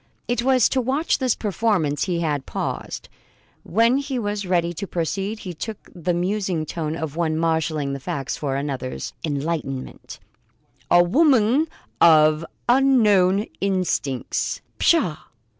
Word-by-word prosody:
It 240 0 0
was 255 -1 +4
to 260 - +1
watch 270 +6 0
this 255 -4 +1
performance 195 -8 0
he 175 -3 -1
had 150 -4 -2
paused. - - -4 0.5
When 230 +7 +2
he 275 -2 -3
was 205 -3 -3
ready 175 -1 +1
to 200 +4 -5
proceed, 195 +6 -2
he 180 - -6
took 215 +6 -7
the 175 0 -2
musing 180 -2 -1
tone 155 0 -3
of 160 -3 -5
one 160 -2 0
marshalling 160 -3 0
facts 135 0 -4
for 140 -3 -3
another's 135 -2 -4
enlightenment: 145 -3 -4 0.7
"A 175 0 +6
woman 265 - +3 0.3
of 155 -1 +6 0.2
unknown 215 -7 +4 0.2
instincts 185 -9 -1
" - - -42
"Pshaw!" 265 - +3
180 Hz, 130 wpm, -22 LUFS, 155-220 Hz, 0.7 s, A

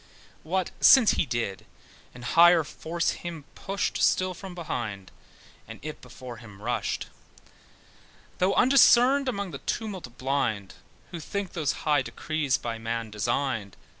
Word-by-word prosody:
What 185 +3 -2
since 255 -5 +7
he 155 - 0
did, 115 -5 -3 0.5
an 125 - -11
higher 170 +5 +6
force 165 +3 -2
him 165 -4 -7
pushed 195 +1 -3
Still 185 0 +2
from 185 0 -9
behind, 110 - -5 0.6
and - - -10
yet 155 0 -7
before 125 -1 -10
him 105 -5 -13
rushed, 120 +4 -2 1.3
Though 185 +2 +2
undiscerned 265 +1 +5
among 200 -6 -3
the - - -7
tumult 190 - -5
blind, 120 -7 -1 0.4
Who 170 - -6
think 200 +3 -4
those 155 -5 0
high 150 -2 +3
decrees 150 0 -1
by 115 -1 -5
man 115 -1 -4
designed. 105 0 -2
150 Hz, 135 wpm, -27 LUFS, 120-185 Hz, 1.3 s, since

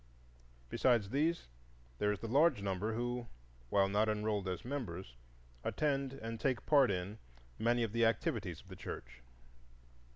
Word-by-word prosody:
Besides 110 - +2
these 160 +5 +1 0.5
there 105 - +3
is 105 - -3
the 115 - -3
large 140 -2 +4
number 100 +3 -1
who, 120 0 -2 0.4
while 100 +5 +4
not 105 +2 +2
enrolled 105 -2 0
as 90 +3 -3
members, 100 - -4 0.5
attend 140 -3 0
and 115 -3 -5
take 130 0 0
part 140 -4 +6
in 95 +3 -2 0.4
many 120 +1 +3
of 115 - -1
the 115 +1 +2
activities 115 -2 0
of - - -22
the - - -8
church. - - -8
115 Hz, 150 wpm, -35 LUFS, 100-130 Hz, 0.5 s, part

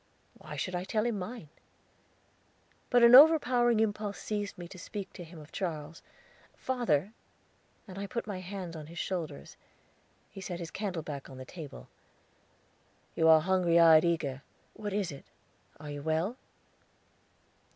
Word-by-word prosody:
"Why - - -9
should 185 - -3
I 180 0 -2
tell 215 +3 -1
him 230 -4 -1
mine?" 190 -4 -7 1.4
But 245 -1 +4
an 235 +1 +8
overpowering 250 -5 +7
impulse 210 -2 -1
seized 205 -1 -4
me 175 -1 -8
to 185 - -11
speak 200 +2 -7
to 180 - -8
him 170 +1 -13
of 150 0 -13
Charles. 165 -3 -5 0.5
"Father," 225 - 0 0.7
and 190 0 -8
I 200 - -4
put 235 +3 -4
my 200 -4 -5
hands 185 -2 -6
on 155 -2 -8
his 170 +2 -11
shoulders. 165 - -4 0.7
He 195 - -9
set 180 -2 -5
his 170 -2 -6
candle 190 -5 -3
back 145 -3 -7
on 130 - -10
the 130 - -8
table. 145 - -10 1.3
"You 160 - +1
look 160 -1 +7
hungry 180 -2 +3
eyed, 160 -2 +7
eager. 155 -6 -1 0.3
What 210 -1 -5
is 195 -3 -1
it? 140 - -11 0.5
Are 150 0 -8
you 145 0 -6
well?" 160 - -1
180 Hz, 155 wpm, -30 LUFS, 160-210 Hz, 1.4 s, an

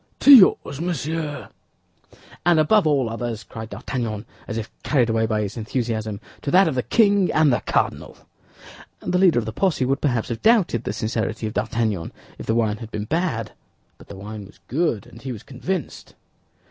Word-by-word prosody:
"To 285 - +9
yours, 185 - +6
monsieur." 160 -3 -3 0.9
"And 175 -2 +4
above 175 +4 +4
all 140 -5 +2
others," 115 -1 -4
cried 110 -1 -9
D'Artagnan, 110 -1 -4 0.2
as 115 - -4
if 110 -1 -5
carried 125 -6 +2
away 110 0 +1
by 110 -1 0
his 105 +3 -5
enthusiasm, 110 -2 -3 0.2
"to - - -3
that 185 +4 +5
of 155 - 0
the 130 - 0
king 200 - +3
and 155 -4 +4
the - - +1
cardinal." - - -2 0.8
The 180 - 0
leader 180 -7 +5
of 120 - 0
the 110 - -5
posse 170 - +1
would 135 +2 0
perhaps 125 -6 0
have 115 - -4
doubted 205 - +3
the - - -2
sincerity 110 +1 -2
of 110 - -4
D'Artagnan 110 -6 -1 0.3
if - - -8
the 110 - +1
wine 110 -2 +1
had 115 -1 -9
been 105 -2 -4
bad; 140 - -1 0.5
but - - -15
the - - -9
wine 105 +1 -8
was - - -20
good, 135 - 0
and 115 - -14
he 130 +2 -5
was 110 -3 -8
convinced. 155 +5 -5
120 Hz, 185 wpm, -22 LUFS, 110-155 Hz, 0.9 s, To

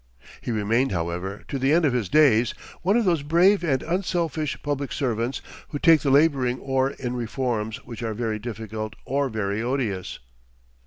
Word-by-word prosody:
He - - -6
remained, 115 +4 +1
however, 90 +3 -3
to 140 - -3
the 135 +2 +2
end 165 +1 +4
of 140 - +2
his 115 -7 -1
days, 125 -5 +4 0.3
one 195 +6 +3
of 235 - +1
those 170 -5 +2
brave 175 +7 +4
and 135 -6 +1
unselfish 170 -4 -1
public 145 -3 -2
servants 120 -1 -2 0.2
who 145 - -4
take 160 +1 +5
the 140 - 0
laboring 135 -3 +3
oar 135 0 +1
in 125 -3 -5
reforms 115 -2 -2
which 120 0 -8
are 110 -2 -3
very 110 -1 -2
difficult 110 -1 -6
or 140 +1 0
very 105 -2 -2
odious. 120 -7 -2
130 Hz, 170 wpm, -24 LUFS, 110-145 Hz, 0.3 s, take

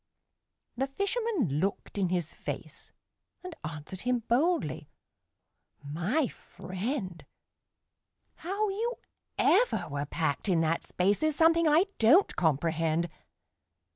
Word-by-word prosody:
The 265 +3 -1
fisherman 395 - -1
looked 195 +4 -2
in 195 -3 +1
his 175 -3 -2
face, - - -7 0.5
And 365 -1 -7
answered 155 +4 -6
him 250 -1 0
boldly: 325 +9 +1 0.9
"My 175 - 0
friend, 190 - -5 1.1
How 400 +4 -1
you 460 +5 -2 0.4
ever 365 - +3
were 145 0 -3
packed 160 +4 -1
in 170 -3 +3
that 165 +1 0
space 195 +3 +1
Is 310 -1 +1
something 330 +1 +4
I 310 +5 +5
don't 295 - +5
comprehend. 165 +1 +1
210 Hz, 110 wpm, -29 LUFS, -, 1.1 s, I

